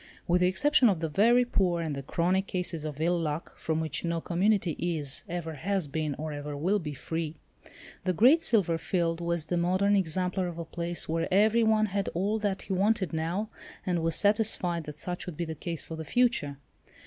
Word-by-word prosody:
With 180 +1 +3
the 180 - +5
exception 260 +5 +4
of 185 -5 0
the 165 - -1
very 235 +9 +4
poor 185 -7 +1
and 160 -3 -2
the 140 - -4
chronic 180 +7 0
cases 175 -4 -1
of 150 -2 -5
ill 170 +2 +1
luck 155 0 -3
from 160 0 -1
which 160 -2 -2
no 170 -1 -1
community 185 +2 +1
is, 155 -5 -2
ever 170 -2 -4
has 185 +3 -1
been, 150 0 -2
or 155 0 -5
ever 145 0 -5
will 185 +8 +1
be 150 -5 -5
free, 160 +2 -4 0.7
the 185 - +1
Great 255 - +5
Silver 175 -8 +2
Field 170 -1 -1
was 170 -2 -1
the 175 +2 -1
modern 185 +4 +2
exemplar 185 0 0
of 170 -1 -6
a 170 - -5
place 170 +1 -4
where 165 +2 -1
every 215 +4 +4
one 220 -1 +3
had 200 -1 -2
all 205 +5 0
that 205 -2 -2
he 195 - -3
wanted 195 -3 +1
now, 170 +7 -2 0.4
and 175 -3 0
was 165 -1 0
satisfied 200 -5 +1
that 150 -1 -8
such 175 +3 -4
would 170 -4 -6
be 170 - -2
the 160 - -4
case 165 +1 -5
for 160 - -7
the 160 - -5
future. 195 - +1
175 Hz, 205 wpm, -28 LUFS, 160-195 Hz, 0.7 s, the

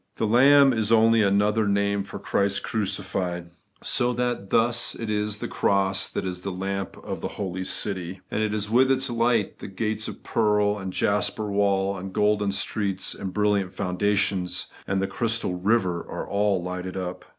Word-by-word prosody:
The 110 - -1
Lamb 135 +4 +6
is 110 -1 0
only 115 0 +5
another 105 +2 +2
name 100 0 +1
for 100 - -8
Christ 100 0 0
crucified: 95 -4 -3 0.3
so 120 0 +2
that 120 -5 -2
thus 120 +1 +2
it 115 -2 -4
is 105 0 -1
the - - -4
cross 95 -1 +1
that - - -4
is 90 -1 -4
the 95 - -4
lamp 95 +1 -4
of - - -5
the - - -2
holy 95 -2 -3
city; 95 -1 -3
and 110 0 0 0.2
with 130 +3 +4
its 130 -1 +1
light, 115 -3 +1
the - - -7
gates 110 +2 -2
of - - -8
pearl, 105 -1 +1
the 95 - -7
jasper 105 +2 0
wall, 100 -1 +1
the - - -6
golden 105 +1 +1
streets, 100 0 -1
the - - -6
brilliant 100 0 0
foundations, 95 -1 0 0.2
and 95 0 0
the - - 0
crystal 115 -4 -1
river, 90 -2 +1
are - - -5
aU 100 0 +1
lighted 90 +1 -4
up. 90 -1 -5
100 Hz, 170 wpm, -25 LUFS, 95-110 Hz, 0.3 s, Lamb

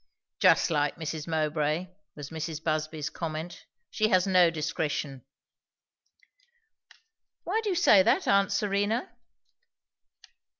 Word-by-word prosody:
"Just - - +4
like 150 -2 0
Mrs. 160 -1 -5
Mowbray!" 155 +2 -1 0.3
was 145 -1 -9
Mrs. 160 0 -5
Busby's 155 -1 -2
comment. 165 +1 -6 0.2
"She 215 -1 +1
has 185 -3 +3
no 185 -3 +4
discretion." 150 -3 -3 2.2
"Why 430 +6 -1
do 430 - -3
you 370 - 0
say 335 - +6
that, - - +1
aunt 200 0 +3
Serena?" 205 +3 -1
165 Hz, 110 wpm, -27 LUFS, 155-195 Hz, 2.2 s, say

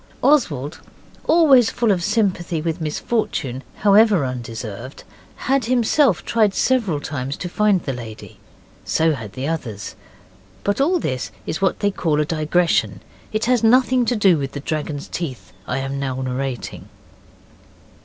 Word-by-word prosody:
Oswald, 155 - +2 0.5
always 285 -8 +5
full 235 -3 +1
of 180 -3 0
sympathy 190 -5 0
with 165 +2 -3
misfortune, 150 - -2
however 205 -5 +4
undeserved, 120 -1 -6 0.4
had 270 -3 +2
himself 245 - +2
tried 215 -4 +2
several 225 - +1
times 140 -1 -4
to 180 - -5
find 200 0 +2
the 135 - -3
lady. 115 -3 -9 0.4
So 160 0 +2
had 110 -7 -7
the 130 +4 -4
others. 115 -11 -4 0.7
But 205 +6 0
all 345 +6 +3
this 130 - -3
is 175 - -4
what 190 - +1
they 205 -1 +2
call 155 -5 0
a 150 - +2
digression; 165 +2 +1 0.3
it 215 +1 -1
has 245 -1 +2
nothing 250 +2 +4
to 245 - +1
do 195 -7 +4
with 135 -1 -4
the 140 - -4
dragon's 150 0 -4
teeth 135 - -6
I 130 - -1
am 135 +1 -3
now 130 -2 -3
narrating. 130 -1 -4
165 Hz, 145 wpm, -21 LUFS, 135-220 Hz, 0.7 s, always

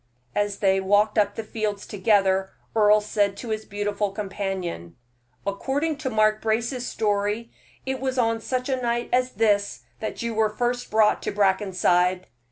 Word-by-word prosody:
As 205 -1 0
they 195 -1 +3
walked 205 +3 +3
up 205 -1 +1
the 225 - -4
fields 215 -2 -3
together, 195 -2 +2 0.3
Earle 210 -1 +5
said 205 -1 0
to 240 - -7
his 215 0 -3
beautiful 205 0 -2
companion: 190 - -4 0.5
"According 275 +10 -1
to 285 -3 -3
Mark 215 -1 +2
Brace's 235 +3 -1
story, 210 +2 -1 0.3
it 265 0 -2
was 260 0 -2
on 230 -2 +1
such 255 +2 -2
a 260 -2 -1
night 240 0 -1
as 250 0 +2
this 205 -1 +1 0.2
that 220 - -4
you 235 0 -2
were 215 -1 0 0.3
brought 215 0 +3
to - - -2
Brackenside." 185 -2 +2
210 Hz, 155 wpm, -24 LUFS, 200-230 Hz, 0.5 s, Earle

